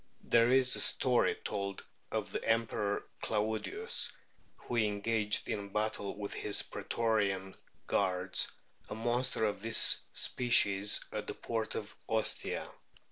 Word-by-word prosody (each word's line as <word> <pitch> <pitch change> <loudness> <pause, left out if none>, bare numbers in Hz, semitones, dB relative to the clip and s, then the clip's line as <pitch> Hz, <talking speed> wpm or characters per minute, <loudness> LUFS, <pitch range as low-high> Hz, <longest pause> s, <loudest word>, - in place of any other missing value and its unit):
There 115 0 +4
is 130 0 +4
a - - -3
story 125 -2 +3
told 100 -2 -4 0.3
of - - -3
the - - -4
Emperor 110 -3 0 0.2
Claudius 110 - -1 0.5
who 120 - -5
engaged 105 0 +1
in 100 -1 -3
battle 105 -1 -2
with 100 -1 -5
his 105 - +1
pretorian 100 -4 -1 0.3
guards 90 0 0 0.4
a - - -5
monster 120 0 0
of 105 -2 -2
this 115 +1 +6
species 105 -5 +3
at - - -5
the - - -4
port 115 -1 -3
of 105 -1 -6
Ostia. 110 -1 -1
110 Hz, 125 wpm, -32 LUFS, 100-115 Hz, 0.5 s, this